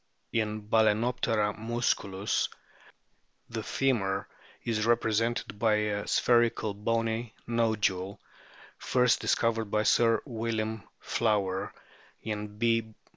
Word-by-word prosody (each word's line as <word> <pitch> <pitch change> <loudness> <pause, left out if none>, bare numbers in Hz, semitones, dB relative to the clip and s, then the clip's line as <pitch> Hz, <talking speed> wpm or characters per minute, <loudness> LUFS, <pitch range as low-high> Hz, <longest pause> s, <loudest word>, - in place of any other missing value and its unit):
In 110 -1 0
Bal&noptera 110 0 +2
musculus 110 -4 -1 1.0
the 115 -1 -3
femur 105 -6 0 0.4
is 110 -1 0
represented 115 -2 +1
by 110 -1 +3
a 105 -1 -1
spherical 120 -3 +2
bony 115 +2 -1
nodule, 105 -5 0 0.6
first 125 -1 +3
discovered 115 -1 +1
by 105 +1 0
Sir 115 +1 +4
William 110 -3 -3
Flower; 100 -4 0 0.5
in 105 -1 -5
B. 115 -1 +1
110 Hz, 90 wpm, -29 LUFS, 105-115 Hz, 1.0 s, Sir